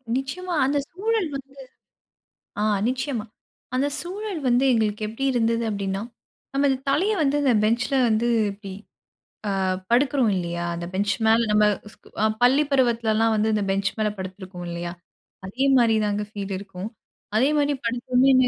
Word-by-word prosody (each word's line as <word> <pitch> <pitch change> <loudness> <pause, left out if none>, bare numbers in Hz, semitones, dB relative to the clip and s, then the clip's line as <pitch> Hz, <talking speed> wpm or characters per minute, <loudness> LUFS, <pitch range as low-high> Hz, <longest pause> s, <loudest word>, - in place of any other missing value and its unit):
நிச்சியமா. 340 +7 -3
அந்த 285 +2 +1
சூழல் 415 -1 0
வந்து 275 0 -8 1.1
ஆ - - +1 0.3
நிச்சியமா. 255 -3 -2 0.5
அந்த 270 +3 +2
சூழல் 390 0 -4
வந்து 245 +2 +3
எங்களுக்கு 215 -2 0
எப்டி 225 +5 -4
இருந்தது 230 -1 +1
அப்டின்னா, 200 -2 -2 0.5
நம்ம 280 +1 +3
இந்த 265 - 0
தலைய 370 +10 +2
வந்து 285 0 +2
அந்த 270 -3 +4
பெஞ்ச்ல 235 +5 +1
வந்து 225 +2 +1 0.2
இப்டி 200 -1 -9 0.9
ஆ - - 0 0.3
படுக்குறோம் 260 -2 +3
இல்லயா! 170 -1 -2
அந்த 170 0 -5
பெஞ்ச் 200 +2 +1
மேல 225 +1 +5
நம்ம 210 0 +5 0.3
ஸ்க் - - -22 0.2
அ - - +5 0.2
பள்ளி 265 +4 +5
பருவத்திலலாம் 230 -4 +2
வந்து 215 +1 +1
இந்த 210 -1 +1
பெஞ்ச் 195 +1 +1
மேல 215 -1 +1
படுத்திருப்போறோம் 185 -1 -7
இல்லயா? 170 0 -4 0.5
அதேமாரி 245 +2 +3
தாங்க 205 0 -1
ஃபீல் 200 -2 -5
இருக்கும். 195 0 -7 0.5
அதே 265 +5 +4
மாரி 290 0 +2
படுத்தோமேனு 255 +2 +3
235 Hz, 145 wpm, -24 LUFS, 205-275 Hz, 1.1 s, மேல